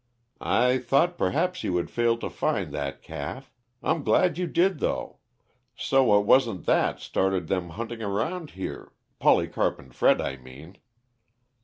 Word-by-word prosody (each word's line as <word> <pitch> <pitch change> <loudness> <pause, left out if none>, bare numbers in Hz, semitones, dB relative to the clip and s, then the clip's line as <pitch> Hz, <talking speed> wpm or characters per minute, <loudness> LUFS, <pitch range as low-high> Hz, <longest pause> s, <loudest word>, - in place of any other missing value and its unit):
"I 125 +1 +2
thought 140 +8 +2
perhaps 175 - 0
you 90 - 0
had 85 - -3
failed 115 -1 +1
to - - -3
find 100 - -1
that 70 -2 -4
calf; 130 - -7 0.3
I'm 165 - +1
glad 175 +2 +3
you 180 - -1
did, 180 +3 +2
though - - -3 0.6
so 125 -4 +3
it 100 - -2
wasn't 115 -5 +3
that - - +2
started 95 -3 -1
them 90 -2 -1
hunting 115 +6 -6
around 115 - -2
here 95 - -6 0.3
Polycarp - - +2
and 65 -2 -16
Fred - - +3
I 65 - -3
mean." 70 +9 -14
115 Hz, 150 wpm, -26 LUFS, 90-135 Hz, 0.6 s, glad